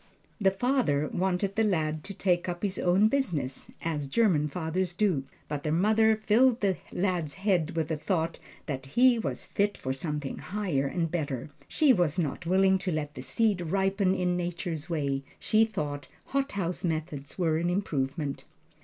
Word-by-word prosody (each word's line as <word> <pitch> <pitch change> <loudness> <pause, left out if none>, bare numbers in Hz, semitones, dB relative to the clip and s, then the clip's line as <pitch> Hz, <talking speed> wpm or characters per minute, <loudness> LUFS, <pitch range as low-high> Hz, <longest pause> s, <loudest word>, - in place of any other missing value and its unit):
The 195 -2 +4
father 190 - +1
wanted 190 +2 0
the 225 - +3
lad 155 -6 0
to 200 - -4
take 180 -2 +1
up 175 +1 -5
his 195 -2 0
own 185 +4 +4
business, 180 - -1
as 150 -4 -2
German 160 -3 +3
fathers 175 +3 -2
do, 175 -9 +1 0.2
but 150 -1 -3
the 150 - -2
mother 220 +6 +4
filled 230 +3 +3
the 195 -3 +1
lad's 175 -5 -1
head 185 -4 0
with 160 -1 -1
the 160 - -1
thought 165 +1 -1 0.3
that 135 -3 -4
he 245 - +4
was - - -3
fit 205 0 0
for 130 - -3
something 150 0 -3
higher 180 -9 -1
and 165 +2 -1
better. 145 -5 -3 0.2
She 295 -4 +4
was 175 - +1
not 165 0 -2
willing 190 +1 +4
to 185 - -2
let 150 -2 -2
the - - -7
seed 195 - +1
ripen 195 +2 +1
in 180 -1 0
Nature's 175 -2 -3
way 140 -4 -1 0.2
she 220 +1 +3
thought 150 -9 -4 0.2
hothouse 200 -11 -1
methods 155 -4 -3
were 165 -4 +2
an 170 +1 0
improvement. 145 -6 -2
175 Hz, 170 wpm, -28 LUFS, 150-200 Hz, 0.3 s, The